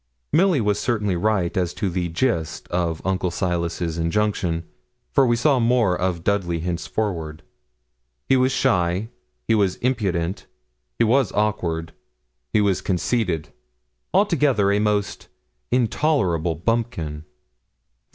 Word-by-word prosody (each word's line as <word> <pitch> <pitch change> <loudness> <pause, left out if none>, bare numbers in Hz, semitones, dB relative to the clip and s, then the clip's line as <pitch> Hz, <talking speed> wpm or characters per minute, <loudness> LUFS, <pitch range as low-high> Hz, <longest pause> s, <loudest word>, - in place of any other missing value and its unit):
Milly 175 -1 +4
was 105 -1 +1
certainly 105 -6 0
right 95 -1 0
as 90 -2 -1
to 100 - -1
the 90 -1 -2
gist 85 - -1
of 85 -2 -1
Uncle 95 -1 0
Silas's 85 -2 -2
injunction, 85 -1 0 0.5
for 135 - +4
we 120 - +3
saw 135 +2 +3
more 115 -5 +3
of 90 -2 -2
Dudley 90 -5 0
henceforward. 85 -2 -3 0.8
He 135 - +4
was 130 0 +3
shy; 95 -6 +1 0.4
he 115 - +3
was 100 -4 +2
impudent; 95 -8 -1 0.5
he - - +3
was 120 0 +3
awkward; 85 -6 -1 0.6
he 105 - +3
was 100 -2 +1
conceited; 90 -3 -1 0.6
altogether 145 - +3
a 100 - +2
most 105 -1 -1 0.4
intolerable 110 - +1
bumpkin. 85 -6 -2
100 Hz, 120 wpm, -23 LUFS, 85-115 Hz, 0.8 s, Milly